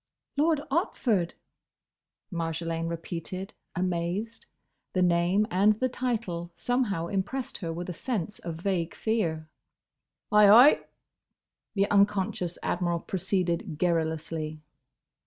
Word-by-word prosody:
"Lord 305 +1 +2
Otford!" 230 - +1 1.0
Marjolaine 165 0 -2
repeated, 170 +3 -5 0.2
amazed. 180 +5 -2 0.5
The 185 - +2
name 175 +4 +3
and 200 +4 +5
the 255 +5 -1
title 225 -9 -2
somehow 240 -9 0
impressed 205 +8 -3
her 170 -5 -3
with 175 +2 -5
a 180 - -4
sense 210 0 -3
of 170 -2 -5
vague 170 -1 -1
fear. 165 -9 -1 0.8
"Ay, 210 -1 +7
ay," 245 +8 +8 1.0
the 200 0 +3
unconscious 200 -3 +2
Admiral 175 -1 0
proceeded 175 -4 -1
garrulously. 160 -2 -1
180 Hz, 100 wpm, -28 LUFS, 170-210 Hz, 1.0 s, ay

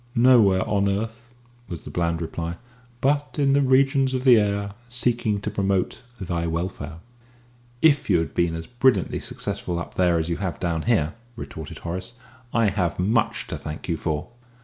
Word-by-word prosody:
"Nowhere 115 -6 +5
on 100 -1 +2
earth," 115 +4 -3 0.4
was 85 -5 -6
the - - -8
bland 85 -1 0
reply; 85 +1 -4 0.4
"but 145 +2 +1
in 140 -2 +3
the 140 - +4
regions 135 0 +3
of 130 - -2
the 125 -4 +7
air, 100 -1 -1 0.2
seeking 120 -4 0
to 105 - -3
promote 100 -2 0 0.2
thy 85 -3 -2
welfare." 80 -1 -4 0.8
"If 150 -3 +4
you - - +5
have 80 - -2
been 85 -1 +1
as 80 0 -5
brilliantly 125 +3 +2
successful 85 - -4
up 85 - -5
there 90 -2 +3
as 80 0 -1
you 85 - -1
have 95 -4 -3
down 85 -3 -1
here," 85 -10 +2 0.2
retorted 80 -9 -8
Horace, 90 +7 -4 0.4
"I 115 -3 +3
have 90 -4 -1
much 105 +5 +1
to - - -5
thank 75 0 -7
you 85 - 0
for." 80 +1 -3
100 Hz, 170 wpm, -24 LUFS, 85-120 Hz, 0.8 s, the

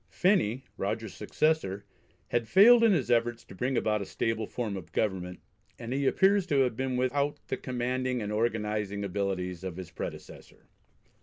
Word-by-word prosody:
Phenney, 135 - +1
Rogers's - - -3
successor, 130 -11 0 0.4
had 120 -1 0
failed 230 - +7
in 225 - +6
his 135 - +1
efforts 120 0 +1
to - - -13
bring 125 +6 -1
about 105 -2 +1
a - - -4
stable 110 -2 -2
form 110 -5 -3
of 85 -4 -8
government, 90 -4 -2 0.4
and 120 +1 -5
he 140 0 0
appears 195 +2 +3
to 140 -4 +3
have 125 -3 +1
been 130 +1 -2
without 140 +3 0
the 130 - -1
commanding 125 0 -2
and 105 -2 -4
organising 105 -2 -1
abilities 95 -2 -3
of 90 -2 -5
his 90 -2 -8
predecessor. - - -9
120 Hz, 165 wpm, -29 LUFS, 100-130 Hz, 0.4 s, failed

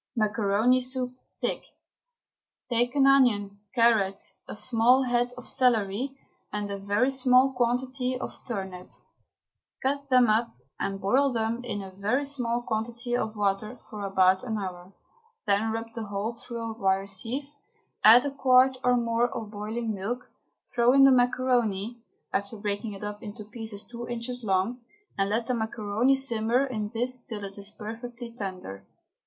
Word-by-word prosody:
MACARONI 215 +2 +2
SOUP 255 0 -1 0.2
(THICK). - - -3 1.1
Take 245 +2 +1
an 275 -1 +5
onion, 215 -7 +4 0.2
carrot, 220 -5 +3 0.3
a - - -6
small 240 +4 +4
head 245 -1 +1
of 250 - -9
celery 250 +1 +1 0.3
and 205 -1 -3
a 200 - -4
very 205 +7 +1
small 260 0 +4
quantity 250 +1 0
of - - -5
turnip; 190 -6 -5 0.9
cut 280 +1 -1
them 255 -2 +5
up 225 +2 +1 0.2
and 195 0 -2
boil 260 +9 +3
them 230 +1 -1
in 205 -5 -4
a 190 - -9
very 210 +9 0
small 245 -4 -1
quantity 235 +2 -2
of 220 -2 -2
water 210 +3 -1
for 210 -2 -6
about 190 -1 +3
an 225 -3 -2
hour. 185 -2 -6 0.5
Then 210 +2 +2
rub 225 0 -5
the 225 -1 -5
whole 200 +2 -2
through 230 -1 -6
a - - -5
wire 195 -3 +1
sieve, 235 +8 -4 0.5
add 235 +5 +8
a 285 - -1
quart 260 -1 +4
or 250 0 +4
more 235 0 +1
of 220 -3 -6
boiling 220 +2 -3
milk, 220 +6 -5 0.4
throw 240 +1 +4
in 275 0 +7
the 270 - +8
macaroni, 245 -3 +1 0.3
after 200 +3 -2
breaking 205 +1 -3
it 195 - -9
up 210 0 -5
into 215 -1 -8
pieces 215 -1 -6
two 235 +2 -8
inches 240 +1 -4
long, 195 +4 0 0.4
and 195 0 0
let 225 +3 0
the 250 - -1
macaroni 220 +2 +1
simmer 245 -1 +2
in 215 -6 -3
this 245 +2 -1
till 220 -4 -7
it 195 0 -7
is 200 0 -4
perfectly 235 +3 -8
tender. 185 - -6
230 Hz, 160 wpm, -27 LUFS, 205-250 Hz, 1.1 s, add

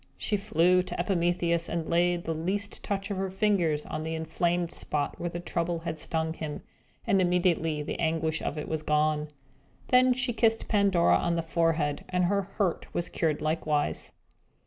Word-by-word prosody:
She 210 - 0
flew 180 -3 +3
to 185 - -6
Epimetheus, 175 -2 +1
and 170 -2 -2
laid 175 0 +2
the 165 - -2
least 190 +6 -3
touch 200 0 -3
of 200 - -2
her 190 0 -1
finger 190 -5 +2
on - - -4
the 160 +1 -3
inflamed 170 +2 -1
spot 145 -4 -2
where 175 - -2
the 175 - -5
Trouble 170 -1 -2
had 160 -2 -4
stung 160 0 -1
him, 155 -2 -6 0.4
and 195 -1 +3
immediately 175 -4 +1
the - - -5
anguish 160 -1 0
of 155 - -3
it 150 - -4
was 160 -1 -2
gone. 150 0 +1 0.6
Then 255 0 +5
she 250 -1 -1
kissed 225 -1 +2
Pandora 200 -5 +4
on 170 0 0
the 165 - -1
forehead, 160 -3 0
and 180 -1 +1
her 200 +2 +2
hurt 195 -2 -2
was 175 - -1
cured 155 -2 -1
likewise. 155 -1 -1
170 Hz, 175 wpm, -28 LUFS, 160-190 Hz, 0.6 s, Then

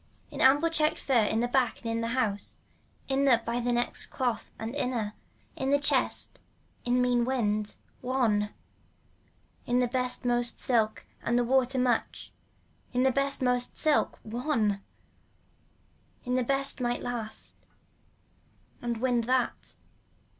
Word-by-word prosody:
In - - -7
the - - +4
ample 290 +5 +5
checked 310 -2 +1
fur 270 - -2
in 220 +2 +1
the 240 - +1
back 255 0 +1
and - - -17
in 230 0 -1
the 230 - -1
house, 205 -5 -1 0.5
in 275 +1 +1
the 250 -4 +5
by 235 +1 -1
next 240 0 -1
cloth 245 -4 -2
and 225 +4 -5
inner, 235 -6 -1 0.4
in 265 - -2
the 285 - +5
chest, 285 - -1 0.4
in 250 +1 +2
mean 245 -1 +2
wind. 215 -5 0 0.3
One. 225 -5 +1 1.2
In 245 - +2
the 250 0 +3
best 250 +1 -1
most 240 0 0
silk 225 -5 +1 0.2
and 240 +1 +1
water 260 0 +2
much, 250 -2 0 0.6
in 250 +1 +2
the 265 - +4
best 275 0 +1
most 250 -1 0
silk. 310 -2 +2
One. 220 -4 0 1.4
In 250 - -1
the 255 0 +2
best 275 +1 +1
might 240 0 -1
last 235 -3 -2 1.2
and 235 -1 -2
wind 240 -1 +1
that. 255 +1 0
245 Hz, 140 wpm, -29 LUFS, 230-260 Hz, 1.4 s, ample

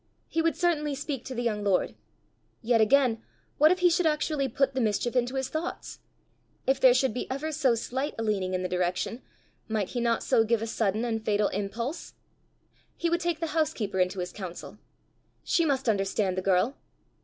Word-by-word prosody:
He 325 - 0
would 330 0 +1
certainly 315 -4 0
speak 275 -3 -4
to 260 - -6
the 240 - -2
young 210 -3 -1
lord! 195 -3 +1 0.7
Yet 230 0 +3
again, 230 0 +3 0.4
what 305 +2 +7
if 365 0 0
he 355 - +6
should 335 0 +2
actually 300 -2 0
put 270 +2 0
the 260 - 0
mischief 225 +2 0
into 250 +1 +1
his 265 -1 -1
thoughts! 320 +3 -5 0.7
If 265 0 +2
there 255 -2 +6
should 260 -3 +2
be 250 - -4
ever 280 +4 -3
so 275 -6 +2
slight 265 +5 -3
a 225 - -2
leaning 195 -4 0
in 185 - -2
the - - 0
direction, 180 +6 -2 0.5
might 215 -4 -1
he 245 - -3
not 235 -1 +1
so 240 -4 +3
give 225 0 +1
a - - -1
sudden 220 0 0
and 225 -2 -2
fatal 210 -1 +1
impulse? 225 - -4 0.8
He 340 0 -1
would 340 0 +1
take 340 -1 -1
the 330 -2 -2
housekeeper 220 -11 0
into 185 +1 +1
his 180 - -5
counsel! 185 -4 -8 0.6
She 335 - +2
must 270 -4 0
understand 195 -2 +1
the 185 - -1
girl! 195 +8 +1
240 Hz, 195 wpm, -28 LUFS, 210-290 Hz, 0.8 s, what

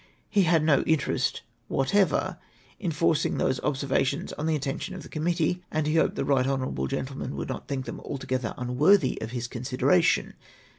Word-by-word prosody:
He 200 -3 +4
had 165 -1 +3
no 150 -3 +4
interest 160 -3 +1 0.2
whatever 195 +8 +1 0.4
in 185 - -2
forcing 160 0 +1
those 130 - +1
observations 140 +2 0
on 150 - -3
the 160 - +2
attention 140 +6 -3
of 185 - -8
the - - -11
committee, 170 +2 0
and 155 -1 -1
he 155 +2 +1
hoped - - +2
the - - -1
right 135 -2 +3
hon. 130 - -1
gentleman 135 - -4
would - - -4
not - - -5
think 135 -3 -3
them - - -6
altogether 130 -4 -3
unAvorthy 140 +11 +3
of 110 - -4
his 120 0 -4
consideration. 140 +9 +1
145 Hz, 170 wpm, -27 LUFS, 130-165 Hz, 0.4 s, He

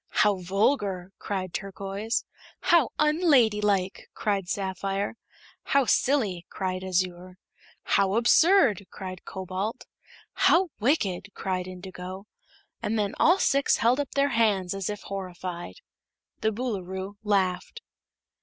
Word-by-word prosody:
"How 205 -2 +3
vulgar!" 195 0 0
cried 185 -3 -4
Turquoise. 195 +3 -3 0.3
"How 335 -7 +4
unladylike!" 220 - +2
cried 200 -4 -1
Sapphire. 195 0 -2 0.5
"How 275 -1 +2
silly!" 220 -11 +1
cried 185 -1 -3
Azure. 185 0 -2 0.5
"How 195 0 +2
absurd!" 240 - +4
cried 185 -1 -8
Cobalt. 190 +5 -4 0.5
"How 365 +1 +4
wicked!" 205 - +1
cried 185 -1 -2
Indigo. 185 +1 -8 0.6
And 220 +2 -1
then 205 -2 0
all 350 +3 +5
six 275 -7 +3
held 240 +4 +3
up 285 - -1
their 280 0 +3
hands 210 -7 +2
as 195 -1 -3
if 210 0 -5
horrified. 180 - -6 0.6
The 220 - +1
Boolooroo 200 -4 -4
laughed. 200 - 0
195 Hz, 110 wpm, -27 LUFS, 185-230 Hz, 0.6 s, all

